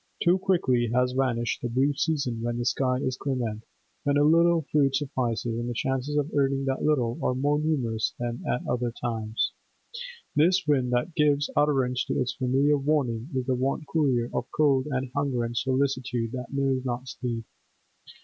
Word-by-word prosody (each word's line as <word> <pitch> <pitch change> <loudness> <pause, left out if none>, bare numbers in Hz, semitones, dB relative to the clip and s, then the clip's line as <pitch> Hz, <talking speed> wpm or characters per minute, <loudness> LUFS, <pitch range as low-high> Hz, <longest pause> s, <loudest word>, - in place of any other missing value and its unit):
Too 175 +2 +4
quickly 130 - +2
has 125 0 +3
vanished 125 -3 0
the 120 - -2
brief 135 +4 +1
season 135 -6 0
when 120 0 -2
the 120 - -2
sky 130 0 +1
is 130 0 -2
clement, 120 -5 -3 0.4
when 145 0 +2
a 145 - +4
little 165 +1 +4
food 140 -3 +3
suffices, 120 -5 -1
and 120 +1 -3
the 120 - -4
chances 135 +4 -1
of 145 +1 0
earning 135 -1 +1
that 135 -1 -1
little 125 -6 +1
are 125 - +1
more 145 +3 +1
numerous 125 -8 -1
than 120 0 -4
at 125 - -2
other 120 0 0
times; 110 -2 -1 0.8
this 180 +5 +3
wind 130 -4 +2
that 125 +8 0
gives 145 -2 +2
utterance 130 -4 +2
to - - -1
its 125 -1 0
familiar 140 +3 +2
warning 135 -4 0
is 130 -1 -1
the 130 - +1
vaunt 135 +5 -1
courier 130 -7 +1
of - - -2
cold 140 -3 +2
and 130 -2 -2
hunger 140 -4 0
and 115 0 -4
solicitude 130 -2 0
that 125 -1 -6
knows 135 -2 0
not 125 0 -3
sleep. 120 -3 -4
130 Hz, 180 wpm, -27 LUFS, 120-145 Hz, 0.8 s, Too